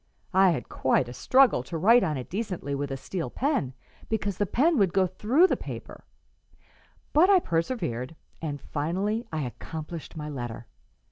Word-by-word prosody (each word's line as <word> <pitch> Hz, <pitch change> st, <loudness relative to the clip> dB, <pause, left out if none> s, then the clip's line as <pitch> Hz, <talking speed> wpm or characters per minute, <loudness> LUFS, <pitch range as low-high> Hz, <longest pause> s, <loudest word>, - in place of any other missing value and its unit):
I 190 Hz, 0 st, +6 dB
had 170 Hz, -, -1 dB
quite 130 Hz, -, +1 dB
a 120 Hz, -, -7 dB
struggle 260 Hz, -, +4 dB
to 165 Hz, +6 st, -5 dB
write 230 Hz, +8 st, +5 dB
on 150 Hz, -2 st, 0 dB
it 125 Hz, -, -6 dB
decently 185 Hz, -8 st, -4 dB
with 140 Hz, 0 st, -2 dB
a 135 Hz, -, -3 dB
steel 170 Hz, +5 st, -4 dB
pen, 250 Hz, -, -1 dB, 0.3 s
because 205 Hz, -3 st, -2 dB
the 205 Hz, -, +1 dB
pen 300 Hz, -, +2 dB
would 190 Hz, -4 st, +3 dB
go 190 Hz, -1 st, +4 dB
through 220 Hz, -, +3 dB
the -, -, +2 dB
paper; -, -, -9 dB, 1.1 s
but 335 Hz, +6 st, +6 dB
I 395 Hz, -, +7 dB
persevered, 165 Hz, -, -2 dB, 0.3 s
and 145 Hz, -3 st, -3 dB
finally 190 Hz, -, -2 dB
I 155 Hz, -2 st, -2 dB
accomplished 160 Hz, +6 st, -7 dB
my 150 Hz, -1 st, -5 dB
letter. 120 Hz, -5 st, -6 dB
170 Hz, 165 wpm, -27 LUFS, 145-220 Hz, 1.1 s, I